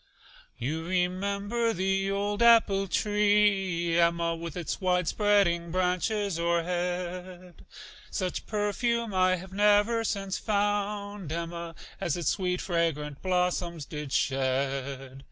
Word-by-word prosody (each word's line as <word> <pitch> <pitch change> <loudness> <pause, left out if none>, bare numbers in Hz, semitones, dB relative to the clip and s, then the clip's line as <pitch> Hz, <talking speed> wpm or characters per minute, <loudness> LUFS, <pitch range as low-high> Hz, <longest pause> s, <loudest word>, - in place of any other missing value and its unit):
You 155 +7 -3
remember 200 +6 0
the 195 +1 0
old 205 +2 -1
apple 220 -4 +5
tree, 200 -4 +2
Emma, 170 0 +2
With 165 0 -7
its 175 +2 -4
wide 180 -2 +1
spreading 195 -5 +2
branches 185 +2 0
o'erhead? 180 +1 -3 0.5
Such 185 -3 -3
perfume 225 +2 -1
I 185 0 +3
have 185 +1 -9
never 210 +3 +3
since 195 -3 -2
found, 205 -3 -1
Emma, 170 0 -5 0.2
As 170 -1 -1
its 165 -4 0
sweet, 180 -1 -1
fragrant 155 -5 -1
blossoms 180 -3 -1
did 150 -2 -6
shed. 135 0 -1
180 Hz, 110 wpm, -28 LUFS, 170-205 Hz, 0.5 s, apple